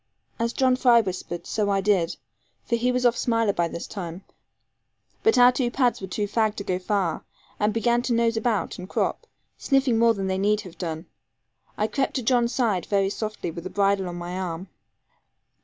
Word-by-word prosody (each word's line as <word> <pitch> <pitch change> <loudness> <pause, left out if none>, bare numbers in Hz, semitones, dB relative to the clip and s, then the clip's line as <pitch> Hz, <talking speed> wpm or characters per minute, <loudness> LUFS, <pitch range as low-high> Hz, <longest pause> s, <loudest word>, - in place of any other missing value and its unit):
As 230 0 0
John 255 0 +2
Fry 245 -2 +5
whispered, 180 -3 -5
so 210 -2 -1
I 195 -1 +2
did, 195 -4 +1 0.5
for 235 - +1
he 245 +2 +1
was 250 0 0
off 240 -1 +4
Smiler 230 -3 +1
by 170 -2 +1
this 170 - -6
time; 180 -1 -7 1.0
but 445 - +3
our 245 0 +8
two 250 -1 0
pads 245 -3 +1
were 190 - -5
too 205 +3 -2
fagged 215 0 +1
to 200 - -5
go 185 -2 -1
far, 185 -4 -1 0.4
and 210 +1 +2
began 235 +2 +1
to 245 0 -1
nose 230 0 +2
about 220 -7 -1
and 180 +1 -8
crop, - - -1 0.3
sniffing 270 -4 +2
more 230 -1 +4
than 195 -1 -3
they 190 0 -1
need 210 +2 +2
have 185 -5 -13
done. 165 -1 -4 0.7
I 210 - +1
crept 265 +5 -1
to 260 - -1
John's 240 0 +2
side 220 -10 0
very 195 -1 +1
softly, 215 -5 -4
with 170 0 -8
the 185 - -5
bridle 195 -1 +1
on 175 - -6
my 175 +1 -5
arm. 180 0 -5
210 Hz, 200 wpm, -25 LUFS, 185-235 Hz, 1.0 s, our